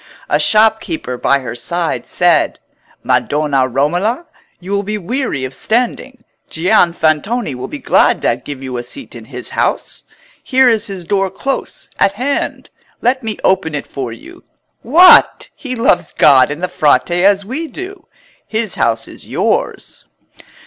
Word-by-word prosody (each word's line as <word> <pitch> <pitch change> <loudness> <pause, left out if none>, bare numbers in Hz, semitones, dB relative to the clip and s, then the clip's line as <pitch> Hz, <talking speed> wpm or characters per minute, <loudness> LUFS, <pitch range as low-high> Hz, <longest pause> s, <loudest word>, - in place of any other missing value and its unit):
A - - +2
shopkeeper 220 - +1
by 140 +3 +1
her 125 - -6
side 165 +8 -3
said— 175 -2 +2 0.4
"Madonna 145 -3 +1
Romola, 175 - -1 0.3
you 185 +2 -9
will 200 0 +1
be 210 +1 -3
weary 205 - -3
of 130 - -7
standing: 245 - -2 0.3
Gian 175 +1 +2
Fantoni 160 - 0
will 125 - -6
be - - -7
glad - - +2
to - - +2
give 140 -2 -7
you 130 -2 -5
a - - -3
seat 260 - -8
in - - -10
his - - -8
house. - - -2 0.4
Here 260 -1 +3
is 225 -2 +2
his 190 -4 -7
door 195 +1 0
close 270 +8 -4
at 195 - +3
hand. 260 +7 -3 0.3
Let 260 +2 +1
me 220 -3 -4
open 185 -5 +1
it 145 - -4
for 130 -4 -5
you. 115 - -13 0.4
What! 340 +10 +6
he 255 -3 -6
loves 235 +2 +1
God 135 -3 +5
and 150 +4 -6
the - - +1
Frate 155 -1 +2
as 195 +3 +2
we 285 +9 -4
do. 375 +4 -9 0.4
His 220 -2 -3
house 115 -1 0
is - - -13
yours." - - -2
195 Hz, 155 wpm, -15 LUFS, 145-235 Hz, 0.4 s, What